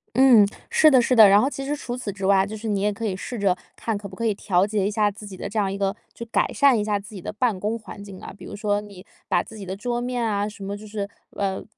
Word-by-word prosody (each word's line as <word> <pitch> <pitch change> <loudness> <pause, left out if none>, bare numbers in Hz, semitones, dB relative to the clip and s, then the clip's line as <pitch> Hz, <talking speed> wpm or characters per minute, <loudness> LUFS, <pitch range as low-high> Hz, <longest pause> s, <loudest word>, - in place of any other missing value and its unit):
嗯， 250 -5 +7 0.2
是 310 -1 +6
的 260 -2 +6
是 250 +1 +2
的。 220 -3 +9
然 200 +1 +6
后 265 - +2
其 275 -1 -6
实 290 +2 -1
除 250 -4 -5
此 240 -5 -4
之 195 0 -5
外， 195 0 +4
就 210 +2 -6
是 220 +1 -6
你 205 -2 0
也 210 +1 +1
可 215 - -8
以 195 -3 -1
试 230 +5 -6
着 195 -3 +2 0.2
看 225 -2 -2
可 200 0 -7
不 190 - -11
可 230 - -3
以 215 - +2
调 185 -2 +2
节 205 -2 0
一 - - -1
下 210 -1 +2
自 205 +1 -10
己 200 -2 -9
的 185 - -6
这 215 - -5
样 200 -2 +1
一 - - -3
个 195 -1 0 0.2
就 - - -8
改 - - +1
善 280 -4 +5
一 - - 0
下 210 -1 0
自 200 +1 -12
己 190 - -7
的 210 - -6
办 220 -3 0
公 215 +4 -1
环 205 -2 -10
境 195 -2 -10
啊。 - - -9
比 - - -11
如 - - -7
说 205 0 0
你 200 -3 -11 0.2
把 - - +2
自 220 - -11
己 200 - -7
的 190 +1 -4
桌 240 +4 -2
面 245 0 -2
啊， 205 -2 0
什 210 -1 -9
么 200 +1 -4
就 210 - -11
是 205 -1 -4 0.2
呃， 195 -1 -2
210 Hz, 335 characters per minute, -24 LUFS, 200-230 Hz, 0.2 s, 的